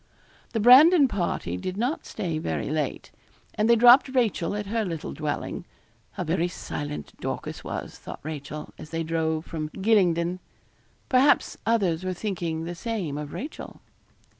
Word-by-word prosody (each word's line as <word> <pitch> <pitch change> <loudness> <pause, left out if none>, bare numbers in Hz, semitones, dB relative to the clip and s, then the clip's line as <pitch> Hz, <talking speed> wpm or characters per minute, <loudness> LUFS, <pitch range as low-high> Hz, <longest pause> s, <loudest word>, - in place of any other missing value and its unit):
The 225 - 0
Brandon 280 - +8
party 175 - -2
did 185 - -5
not 245 +8 -2
stay 170 -7 -3
very 80 - -3
late. - - -3 0.4
And 215 +2 +1
they 235 - +7
dropped 245 +4 +7
Rachel 230 -8 0
at 210 0 -3
her 225 +3 -1
little 165 -6 -4
dwelling. 150 -2 -3 0.5
How - - -3
very 170 +1 0
silent 150 -4 -6
Dorcas - - -4
was, - - -6
thought - - -8
Rachel, 150 0 -7
as 155 - -9
they 165 0 -2
drove 160 0 -1
from 155 -2 -4
Gylingden. 185 -4 +2 0.7
Perhaps 270 +2 +3
others 190 -7 +1
were 185 0 -2
thinking 170 -5 -3
the 170 +1 -4
same 185 -5 -3
of 150 0 -5
Rachel. 295 +4 -7
180 Hz, 150 wpm, -26 LUFS, 160-225 Hz, 0.7 s, Brandon